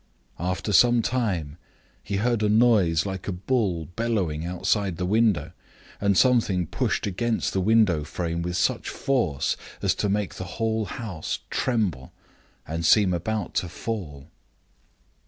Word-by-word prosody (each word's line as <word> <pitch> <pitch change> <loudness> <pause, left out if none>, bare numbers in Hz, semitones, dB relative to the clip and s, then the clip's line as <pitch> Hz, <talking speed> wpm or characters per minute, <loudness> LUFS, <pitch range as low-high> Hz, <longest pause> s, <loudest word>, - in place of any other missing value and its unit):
After 90 +4 -2
some 120 +2 +5
time, 95 - -1 0.4
he 100 - -4
heard 115 +2 +1
a 105 - +2
noise 105 -7 +4
like 95 -2 -5
a - - 0
bull 95 -3 -1
bellowing 100 -10 -1
outside 95 +1 -1
the 90 - -2
window, 105 -1 +2 0.5
and 100 -2 +2
something 110 -8 +3
pushed - - -1
against 110 +4 -1
the 95 - +1
window 100 -6 +3
frame 85 +2 -3
with 90 +1 -2
such 90 - 0
force 120 - 0 0.2
as - - +1
to 105 - -1
make 100 -1 -1
the 90 - -6
whole 110 -1 0
house 95 -4 -5
tremble 100 - -1 0.6
and 80 +2 -3
seem 95 +3 +5
about 105 +4 -2
to 90 - -1
fall. 80 -10 -6
95 Hz, 140 wpm, -25 LUFS, 85-110 Hz, 0.6 s, some